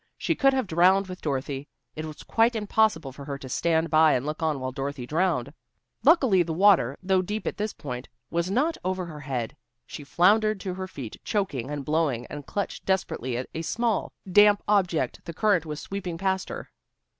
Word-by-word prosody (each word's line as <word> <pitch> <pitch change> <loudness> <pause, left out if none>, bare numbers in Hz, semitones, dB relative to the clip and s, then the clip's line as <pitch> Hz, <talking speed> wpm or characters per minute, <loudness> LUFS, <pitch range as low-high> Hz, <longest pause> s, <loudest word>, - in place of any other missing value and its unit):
She - - 0
could 275 -1 +3
have 260 -2 +1
drowned 185 +3 +4
with 185 -1 -9
Dorothy. 140 -1 -3 0.3
It 155 - -4
was 155 -1 -9
quite 230 +1 +2
impossible 210 -8 +1
for 140 +2 -10
her 140 -1 -4
to 135 - -9
stand 160 +4 0
by 155 -1 +6
and 125 +1 0
look 150 +2 -4
on 155 -3 0
while 130 0 -3
Dorothy 135 -1 -4
drowned. 150 -3 0 0.5
Luckily 265 - +5
the 165 -2 -2
water, 175 - +4
though 190 0 +3
deep 210 +3 -4
at - - -3
this 210 +1 -2
point, 125 -2 -7 0.2
was 170 +1 0
not 290 +11 +1
over 185 0 -2
her 155 -3 -8
head. 130 -5 -4 0.3
She 145 - -8
floundered 210 +8 +3
to 185 - -3
her 185 +1 -5
feet 135 -10 -8
choking 145 - -2
and 145 -2 -4
blowing, 150 -6 0
and 145 -3 -7
clutched 200 +11 -3
desperately 130 -10 -1
at 125 - -4
a 160 - -3
small, 230 +5 -1 0.2
damp 205 +1 +6
object 190 -6 +1
the 170 - -6
current 195 -6 +2
was 150 -1 -4
sweeping 180 -3 -5
past 190 +1 -1
her. - - -7
170 Hz, 195 wpm, -26 LUFS, 145-200 Hz, 0.5 s, by